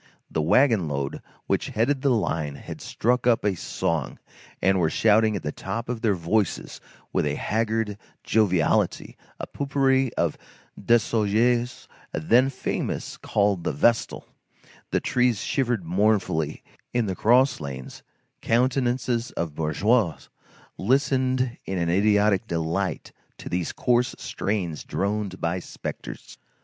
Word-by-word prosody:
The 80 - 0
wagon 110 - +3
load 70 -1 -3 0.2
which - - 0
headed 130 +5 0
the 140 - +2
line 80 - 0
had - - -9
struck 125 +2 0
up 115 -3 +3
a 105 - +3
song, 85 -3 -2 0.4
and 95 +1 +3
were 80 -3 +2
shouting 110 +3 +3
at 95 - -4
the 75 - -2
top 115 +9 -5
of 120 -2 -3
their 105 -4 +2
voices 95 +5 -1 0.3
with - - +1
a - - -1
haggard 110 -1 -1 0.2
joviality, 95 -8 +1 0.2
a - - -3
pot 140 -1 -5
pourri 135 -1 +3
by 85 - +2 0.4
Desaugiers, 115 +2 +1 0.3
then 120 +12 +3
famous, 130 - -3
called 100 -4 0
The - - -1
Vestal; 115 +11 +1 0.6
the - - +1
trees 125 -5 +1
shivered 120 -7 0
mournfully; 90 -4 +1 0.3
in 120 -2 +2
the 95 -2 -2
cross 125 +6 +4
lanes, 65 -4 -7 0.4
countenances 125 0 +1
of 80 -3 -3
bourgeois 85 +6 +1 0.6
listened 130 +1 +1
in 95 - -3
an 85 -1 0
idiotic 105 +1 +3
delight 85 +3 -2 0.3
to - - -8
these 90 -2 -1
coarse 125 +2 +1
strains 90 -7 -3
droned 100 -1 -2
by 85 +2 -1
spectres. - - -8
105 Hz, 130 wpm, -25 LUFS, 90-120 Hz, 0.6 s, cross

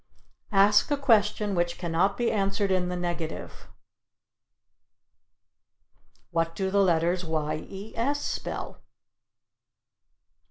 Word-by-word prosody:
Ask 205 +5 +5
a 290 - +1
question 215 -6 +2
Which 175 -1 0
cannot 175 +3 0
be 240 -1 +1
Answered 195 0 0
in 180 -1 +1
the 180 - -2
Negative. 175 -2 -5 2.6
"What 165 0 0
do 190 -1 -1
the 200 0 +3
letters 175 0 +2
y 155 -2 -2
e 200 +3 -9
s 280 +5 0
spell?" - - -5
190 Hz, 105 wpm, -27 LUFS, 170-205 Hz, 2.6 s, Ask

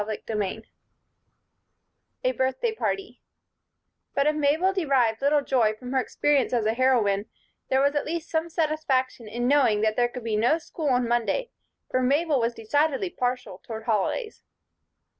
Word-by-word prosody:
CHAPTER 215 +1 -5
XIV 210 +1 -2 1.6
A - - +2
Birthday 265 - -1
Party 395 -2 -3 0.9
BUT 280 - +2
if 300 0 +2
Mabel 305 +6 +2
derived 265 - +1
little 285 +1 +3
joy 230 -6 +2
from 250 +3 -9
her 265 - +2
experience 275 0 +1
as 235 -3 +1
a 220 - +2
heroine, 225 -5 +2 0.4
there 265 0 +3
was 285 0 +3
at 290 - -1
least 335 +1 -3
some 320 +1 0
satisfaction 300 -7 -1
in 240 +3 -2
knowing 255 -7 +3
that 215 0 +1
there 240 0 +2
could 250 -1 -8
be 225 -2 -1
no 240 +9 +3
school 315 -2 -4
on 250 -2 +2
Monday, 240 - 0 0.4
for 255 - +1
Mabel 285 +3 +2
was 230 0 0
decidedly 290 - 0
partial 250 - -3
toward 220 -1 -7
holidays. 230 - -1
260 Hz, 160 wpm, -26 LUFS, 230-305 Hz, 1.6 s, little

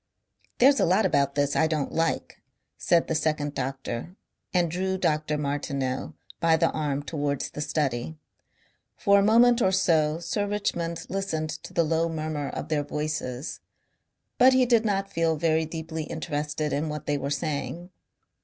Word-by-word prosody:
"There's 275 +3 +5
a - - +4
lot 185 +5 +3
about 140 -2 +2
this 145 -1 +1
I 160 - +3
don't 155 -3 -1
like," 165 0 -1 0.3
said 170 -1 +2
the - - -2
second 150 -2 0
doctor 135 +4 -4 0.4
and 175 -3 +1
drew 190 +2 -1
Dr. 155 -3 0
Martineau 140 -2 -2 0.2
by 165 -1 +4
the - - +2
arm 145 -2 -2
towards 145 -2 -2
the 150 - -6
study. 145 -1 -1 0.8
For 200 -2 +4
a - - +3
moment 235 +3 +5
or 190 - +3
so 160 -5 +2
Sir 205 +4 -2
Richmond 170 -5 -2
listened 160 -5 -2
to 160 - -8
the 170 - +2
low 165 +1 +1
murmur 155 -2 -3
of - - -6
their 150 -2 +1
voices, 150 -3 -4 0.8
but 260 +1 +7
he 255 -1 +4
did 235 -2 +3
not 195 -1 -1
feel 165 -1 +2
very 160 0 +1
deeply 160 0 -5
interested 150 -1 -3
in 150 +2 -1
what 150 -1 -5
they 145 -1 0
were 140 - -3
saying. 150 +3 -3
155 Hz, 165 wpm, -26 LUFS, 145-175 Hz, 0.8 s, but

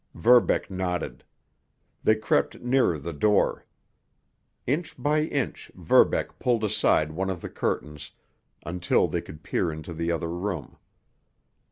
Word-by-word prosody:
Verbeck 120 +4 +4
nodded; 90 -8 -3 0.8
they 110 - +5
crept 110 - 0
nearer 125 -9 +2
the 80 +4 -6
door. 105 +7 +2 1.0
Inch 150 +6 -2
by 150 +1 +1
inch, 140 -5 -3
Verbeck - - +2
pulled 120 -3 +1
aside 90 -7 +2
one 95 +4 -2
of 95 -2 -4
the - - -6
curtains, 75 -1 -3 0.6
until 90 +1 +1
they - - -2
could 75 0 -12
peer 85 - -1
into 80 +2 -7
the 85 +1 -2
other 85 0 -2
room. 90 -4 -4
90 Hz, 130 wpm, -26 LUFS, 80-110 Hz, 1.0 s, they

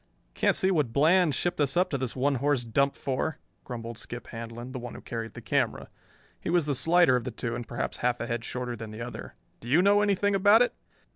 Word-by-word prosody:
"Can't - - +2
see 190 - +2
what 150 -10 +1
Bland 160 +3 +4
shipped 175 -3 0
us 140 +2 +1
up 185 +1 +2
to 140 - 0
this 130 -2 -3
one 140 +2 +1
horse 140 -3 +2
dump 140 +5 +1
for," 135 +3 -2 0.3
grumbled 115 -2 -6
Skip 120 -1 -7
Handlon, 115 +2 -7
the 130 - -5
one 120 0 -7
who - - -9
carried 115 -2 -6
the - - -8
camera. - - -1 0.5
He - - -5
was 175 -3 +3
the 145 - 0
slighter 165 +2 +4
of 125 - 0
the 125 - -3
two 115 0 -4
and 120 -1 -5
perhaps 120 - -3
half 125 0 0
a - - -3
head 120 -1 -3
shorter 125 0 -4
than 110 -1 -8
the 110 +2 -8
other. 120 - -8 0.2
"Do 120 - -9
you 150 +7 +5
know 205 +1 +5
anything 205 0 +2
about 205 +4 +6
it?" 245 - -1
130 Hz, 235 wpm, -28 LUFS, 120-170 Hz, 0.5 s, about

